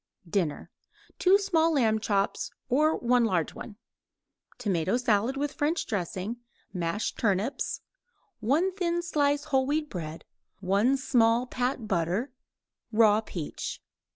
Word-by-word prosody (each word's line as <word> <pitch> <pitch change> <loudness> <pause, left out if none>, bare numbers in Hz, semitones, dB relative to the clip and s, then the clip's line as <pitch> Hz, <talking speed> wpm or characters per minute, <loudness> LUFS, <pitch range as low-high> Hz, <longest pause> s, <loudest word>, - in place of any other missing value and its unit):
DINNER 165 -4 -2 0.5
2 380 +2 +6
small 330 -5 +2
lamb 225 -6 +2
chops 200 -2 0 0.2
or 305 +5 +3
1 245 0 +3
large 180 -8 0
one; 210 - -9 0.8
tomato 195 -3 0
salad 240 +1 +1
with 290 +1 -2
French 315 +3 0
dressing; 195 +2 -3 0.4
mashed 175 +3 -2
turnips; 215 +5 0 0.6
1 290 - +2
thin 345 -2 -1
slice 290 -4 +1
whole 265 -4 +1
wheat 300 +1 -1
bread; 160 -3 -6 0.3
1 200 +8 +2
small 240 -2 +3
pat 250 -2 -2
butter; 190 - 0 0.6
raw 215 -1 +5
peach. 170 -8 -5
235 Hz, 120 wpm, -28 LUFS, 200-285 Hz, 0.8 s, 2